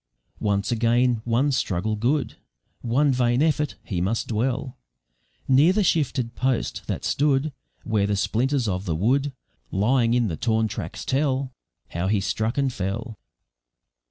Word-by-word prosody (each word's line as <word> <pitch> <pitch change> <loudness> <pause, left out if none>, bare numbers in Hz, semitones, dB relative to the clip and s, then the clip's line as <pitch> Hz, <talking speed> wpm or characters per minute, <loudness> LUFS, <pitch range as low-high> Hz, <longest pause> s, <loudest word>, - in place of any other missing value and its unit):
Once 100 0 0
again, 120 0 +2
one 120 +5 +2
struggle 110 -4 -1
good, 120 +2 0 0.5
One 135 +5 +2
vain 125 +1 +2
effort; 150 -2 +1
he 90 -5 -3
must 105 +6 -1
dwell 125 +3 -2 0.7
Near 140 +7 +5
the 210 +1 +2
shifted 130 -9 0
post, 130 -2 -1
that - - -3
stood 145 0 +1 0.3
Where 105 -3 +1
the 105 - 0
splinters 125 +5 0
of 95 0 -2
the 80 - -1
wood, 135 - +1 0.4
Lying 115 +4 +2
in 120 -2 +2
the 80 -5 -3
torn 110 -1 +1
tracks, - - -6
tell 135 -1 0 0.4
How 85 +2 -2
he 105 +1 +2
struck 110 +5 -1
and 135 -2 +1
fell. 105 +3 -4
120 Hz, 145 wpm, -24 LUFS, 105-135 Hz, 0.7 s, Near